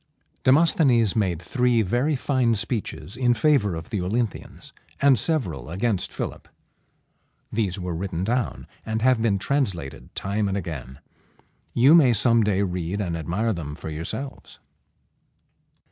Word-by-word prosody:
Demosthenes 130 - +4
made 95 -7 0
three 125 +4 +1
very 125 +10 +1
fine 125 -3 +1
speeches 105 -2 -3
in 120 -1 +2
favor 115 - +2
of 80 -1 -8
the 105 - -1
Olynthians, 110 +4 -3 0.3
and 140 -1 +5
several 105 - -1
against 95 +2 -1
Philip. - - -6 1.0
These 100 -4 -1
were 90 -1 -4
written 85 0 -3
down, 120 +3 -1 0.2
and 110 0 -3
have 130 -2 +3
been 110 -3 +2
translated 95 - -2
time 100 +1 -1
and 100 0 -1
again. 70 -8 -6 0.8
You 130 +6 +6
may 140 -8 +6
some 115 +2 +3
day 100 -1 +1
read 90 +1 -3
and 90 -5 -2
admire 90 +8 -1
them 75 -5 -6
for 80 - -7
yourselves. 85 - -6
105 Hz, 135 wpm, -24 LUFS, 90-125 Hz, 1.0 s, You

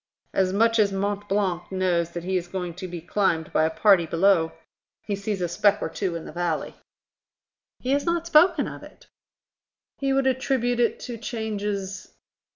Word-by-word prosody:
"As 185 -1 +2
much 230 +3 +3
as 205 -2 +4
Mont 200 +1 -2
Blanc 185 -3 -1
knows 180 -3 +1
that 170 0 -6
he 190 +1 -2
is 175 -1 -1
going 180 -1 -4
to 185 +2 -7
be 175 -2 -7
climbed 170 -2 0
by 155 - +3
a - - +2
party 180 0 +4
below. 165 -1 +3 0.5
He 205 - -2
sees 200 -1 -3
a 175 - +1
speck 205 +4 +2
or - - -3
two 185 -4 -3
in 165 - -6
the - - -8
valley." 175 -2 -2 1.0
"He 255 - -3
has 285 +1 +2
not 340 -1 0
spoken 340 +2 +4
of - - -8
it." - - -15 0.9
"He 275 -1 0
would 270 0 +2
attribute 255 -2 +1
it 235 - +2
to 235 -2 -6
changes 205 -4 -4
195 Hz, 180 wpm, -25 LUFS, 175-230 Hz, 1.0 s, as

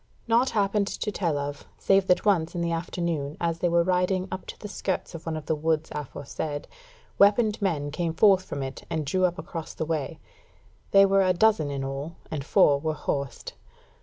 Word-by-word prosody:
Naught 235 +3 +3
happened 200 -1 +1
to 210 - -3
tell 170 -7 -1
of, 145 0 -5
save 195 -1 +3
that 180 - +3
once 175 -6 +2
in 175 - -1
the 170 0 0
afternoon, 165 -3 -2
as 165 -1 -1
they 175 - +1
were 170 0 +3
riding 185 +1 +1
up 185 - -6
to - - -8
the 210 - -8
skirts 195 -2 -3
of 165 0 -9
one 160 -1 -2
of 155 - -7
the 160 - 0
woods 160 0 0
aforesaid, 145 +1 -5 0.5
weaponed 210 +2 +4
men 150 -7 -1
came 165 +1 -2
forth 190 0 +5
from 140 -5 -5
it 135 0 -7
and 155 -2 -2
drew 185 +6 +2
up 175 0 -1
across 165 -4 -7
the 160 - -2
way; 155 -3 -2 0.7
they 195 0 +7
were 195 0 +4
a 185 -1 +3
dozen 180 -5 +3
in 140 -1 -3
all, 135 +5 -5 0.2
and 150 -3 -3
four 145 -3 +4
were 155 +1 -2
horsed. 140 -3 -4
170 Hz, 200 wpm, -26 LUFS, 150-195 Hz, 0.7 s, they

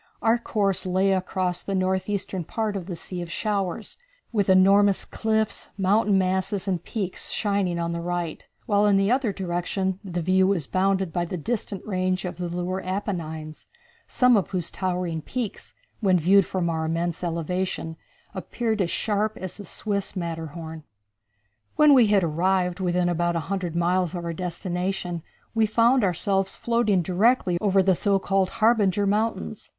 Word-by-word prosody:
Our 230 +1 +3
course 200 -5 0
lay 190 +2 +2
across 185 -1 -1
the 195 - -3
north 190 +1 0
eastern 195 -3 -2
part 215 +4 -2
of 185 -3 -5
the 180 - -4
Sea 175 +2 -6
of 170 -1 -6
Showers, 200 0 -2 0.4
with 205 -3 +1
enormous 195 +1 +5
cliffs, 220 -1 -1
mountain 200 +1 +3
masses 190 +1 0
and 180 -3 -1
peaks 195 -5 -4
shining 200 -4 0
on 170 0 -2
the 170 0 -3
right, 175 -2 -4 0.2
while 205 -2 +3
in 200 -1 +4
the 195 +3 +2
other 255 -4 +2
direction 190 +1 -2
the 175 -3 -3
view 185 +2 +3
was 185 -7 +1
bounded 190 0 0
by 175 -1 0
the 180 +2 -4
distant 205 +1 -4
range 185 -2 -1
of 180 -1 -5
the 175 - -2
lunar 180 +2 -3
Apennines, 165 -5 -4 0.4
some 250 -1 +4
of 200 - +1
whose 180 -4 -2
towering 180 -3 -2
peaks, 235 +2 -5 0.2
when 190 -4 +3
viewed 185 +3 +4
from 185 -2 -1
our 160 -1 -1
immense 165 +1 -2
elevation, 170 0 -2 0.4
appeared 225 -3 -2
as 175 - 0
sharp 215 +3 -1
as 185 -2 -6
the 205 - -9
Swiss 200 +2 -2
Matterhorn. 160 -2 -5 0.9
When 300 -1 +6
we 250 -5 +6
had 205 -2 +3
arrived 180 +3 +1
within 180 -1 +1
about 175 0 0
a - - +1
hundred 180 -4 -2
miles 175 0 +1
of 175 -1 -4
our 170 - -2
destination 180 0 -3 0.3
we 225 -1 +3
found 235 +3 +3
ourselves 195 +1 0
floating 230 -6 +1
directly 185 0 +2
over 195 -2 +3
the 190 0 +4
so 200 +2 +2
called 195 -1 +1
Harbinger 210 -3 +2
Mountains. 200 - -1
185 Hz, 165 wpm, -25 LUFS, 175-205 Hz, 0.9 s, When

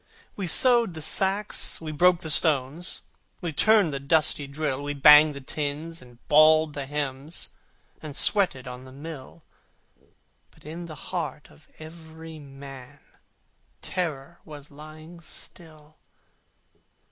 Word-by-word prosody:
We 195 -3 -4
sewed 235 +1 +4
the 160 - -6
sacks, 195 +4 +1
we 160 -1 -7
broke 175 +3 +3
the 160 - 0
stones, 150 +2 +2 0.4
We 170 -3 -5
turned 210 -2 +3
the 140 - -3
dusty 145 0 0
drill: 140 -1 -3
We 145 0 -4
banged 150 +1 +7
the 140 - -8
tins, 150 +4 -4
and 120 -1 -17
bawled 155 0 +5
the 140 -2 -6
hymns, 145 +2 -4 0.5
And 150 -3 -8
sweated 180 - +2
on 125 +1 -9
the 130 - -13
mill: 150 +2 -10 1.1
But - - -23
in 170 +3 -8
the 155 - -9
heart 170 -4 -6
of 155 - -22
every 160 0 -12
man 135 -1 -12 0.8
Terror 165 -2 -4
was 150 -2 -12
lying 155 +3 -13
still. 155 -2 -11
155 Hz, 130 wpm, -25 LUFS, 140-165 Hz, 1.1 s, banged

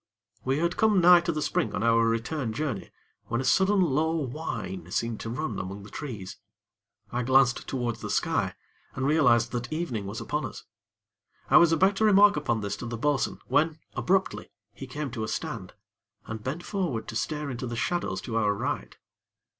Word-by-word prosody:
We 135 +2 +1
had 170 +3 0
come 215 -3 +4
nigh 175 0 +8
to 170 0 -1
the 155 -2 -2
spring 110 - 0
on 100 - -1
our 115 0 +4
return 115 +2 -1
journey, 125 -6 -3 0.4
when 115 - -2
a - - -1
sudden 190 +7 +3
low 160 +1 +1
whine 160 +5 -4
seemed 115 -2 -2
to 115 - -5
run 155 +7 -3
among 100 +2 -6
the 105 - -12
trees. 110 -11 -7 0.7
I 120 - -1
glanced 130 0 +3
towards 120 -3 -2
the - - -5
sky, - - 0 0.4
and 130 - -1
realized 125 -6 +4
that 120 -1 -2
the 140 - -5
evening 125 - -3
was 105 +3 -5
upon 150 +1 -2
us. - - -7 0.9
I - - +9
was 170 -1 +6
about 190 +5 +4
to 220 - +1
remark 205 0 +6
upon 120 -7 -1
this 100 -1 -2
to 120 - -6
the 115 0 -4
bo'sun, 145 +2 0
when, 150 +4 +2 0.2
abruptly, 190 +1 0 0.2
he 135 - -8
came 140 +1 -4
to 115 -3 -4
a - - -2
stand, - - -4 0.5
and 110 -1 -6
bent 155 +8 -4
forward 175 - -2
to - - -6
stare 150 +4 -2
into 125 0 -4
the 120 - -4
shadows 175 +9 -1
to 115 -3 -3
our 105 -2 +2
right. - - -3
135 Hz, 195 wpm, -27 LUFS, 115-160 Hz, 0.9 s, I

